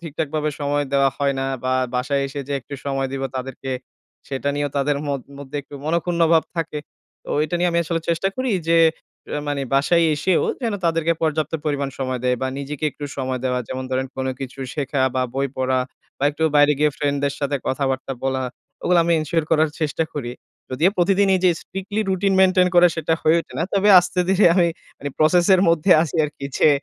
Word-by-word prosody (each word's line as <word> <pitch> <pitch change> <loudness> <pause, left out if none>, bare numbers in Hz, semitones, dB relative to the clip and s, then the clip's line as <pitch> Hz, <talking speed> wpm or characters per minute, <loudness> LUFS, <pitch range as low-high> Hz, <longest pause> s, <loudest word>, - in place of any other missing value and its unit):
ঠিকঠাকভাবে 155 -2 -2
সময় 145 0 0
দেওয়া 140 -1 +4
হয় 140 -1 +1
না, 135 - -1 0.2
বা 130 - +1 0.2
বাসায় 140 +2 0
এসে 140 +1 -5
যে - - -2
একটু 140 +4 -9
সময় 135 -1 -1
দিবো 135 0 -2
তাদেরকে, 135 +1 -5 0.6
সেটা 140 +1 -2
নিয়েও 145 0 -1
তাদের 140 +1 +1
মোদ 140 -1 -1 0.2
মধ্যে 140 +1 -7
একটু 145 - -14
মনক্ষুণ্ণভাব 170 0 +2
থাকে। 165 -2 -2 0.5
তো - - -13
এইটা 155 +3 -2
নিয়ে 175 0 +2
আমি 170 - +2
আসলে 165 0 -1
চেষ্টা 170 +3 +1
করি 255 -1 -1 0.2
যে 165 0 +5 0.6
এ - - -1
মানে 140 -1 -1
বাসায় 165 +5 +3
এসেও 170 +4 +1 0.2
যেন 225 -3 0
তাদেরকে 165 0 +2
পর্যাপ্ত 155 -1 0
পরিমাণ 145 -2 -1
সময় 130 -1 -2
দেই 125 0 +2
বা 130 - 0
নিজেকে 140 +2 -5
একটু 145 - -8
সময় 130 -1 -2
দেওয়া। 125 -1 0
যেমন 130 0 -4
ধরেন 130 +1 0
কোন 130 0 -2
কিছু 135 0 -7 0.2
শেখা 140 -1 -2 0.2
বা 130 - +2
বই 135 +1 +1
পড়া। 130 0 +1 0.4
বা 140 - -1
একটু 150 +2 -6
বাইরে 145 0 +6
গিয়ে 150 0 +3
ফ্রেন্ডদের 140 -1 -1
সাথে 140 0 0
কথাবার্তা 135 0 -1
বলা, 135 0 0 0.4
ওগুলো 180 -1 +3
আমি 170 - +2
ensure 155 +1 -1
করার 160 -1 +3
চেষ্টা 155 +1 0
করি। 120 -5 -4 0.4
যদিও 155 +9 +2
প্রতিদিন 195 +2 +3
এই 185 - +1
যে 180 - +6
strictly 195 +3 -4
রুটিন 195 +1 +1
মেইনটেইন 185 -1 +5
করে 175 0 +7
সেটা 165 0 0
হয়ে 160 +2 +4
ওঠে - - -13
না। - - +1
তবে 200 +1 +3
আস্তে-ধীরে 180 +2 +2
আমি 175 -2 +4 0.3
মানে 145 0 -5
প্রসেস 170 +3 +4
এর 185 - +3
মধ্যে 165 +2 +2
আছি 165 0 -4
আরকি 145 -1 -6
যে - - +6
150 Hz, 195 wpm, -21 LUFS, 135-170 Hz, 0.6 s, করে